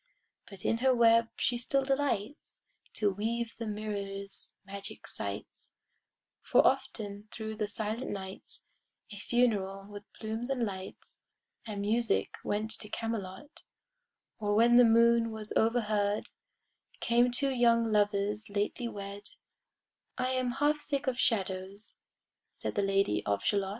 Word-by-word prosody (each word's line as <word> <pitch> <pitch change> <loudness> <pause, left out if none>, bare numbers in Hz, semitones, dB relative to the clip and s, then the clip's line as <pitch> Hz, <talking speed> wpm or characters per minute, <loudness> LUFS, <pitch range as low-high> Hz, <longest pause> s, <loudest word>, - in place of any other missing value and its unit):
But 195 -2 -10
in 230 - +2
her 260 +1 +4
web 230 -1 +5
she 240 -1 +1
still 275 +3 +1
delights 270 -3 -2 0.3
To 205 -2 +2
weave 230 +4 -2
the 230 - -3
mirror's 200 -2 -5
magic 200 0 -8
sights, - - -6 0.7
For - - +4
often 205 -1 0
thro' 220 -1 -5
the 215 -1 -2
silent 220 +4 -3
nights 190 -1 -7 0.5
A 205 - -8
funeral, 200 -4 +1
with 205 0 -10
plumes 220 +3 -4
and 255 -3 +1
lights 190 -2 -8 0.5
And 205 -2 -4
music, 225 +3 +1
went 215 +2 -1
to 210 - -7
Camelot: 225 - -5 0.8
Or 205 -1 +1
when 235 +2 +6
the 245 - +9
moon 230 0 +5
was 220 -1 -5
overhead, 215 -3 +1 0.7
Came 240 +1 +3
two 270 +3 +1
young 230 -2 +3
lovers 205 0 +1
lately 205 +4 -1
wed; 200 -1 -7 0.9
"I 255 +1 0
am 255 -1 0
half 295 +2 +2
sick 280 -2 -2
of 260 -2 -1
shadows," 195 -1 -1 0.6
said - - -4
The 205 - +1
Lady 195 - +2
of 100 -1 0
Shalott. 200 -1 +1
220 Hz, 135 wpm, -31 LUFS, 200-235 Hz, 0.9 s, the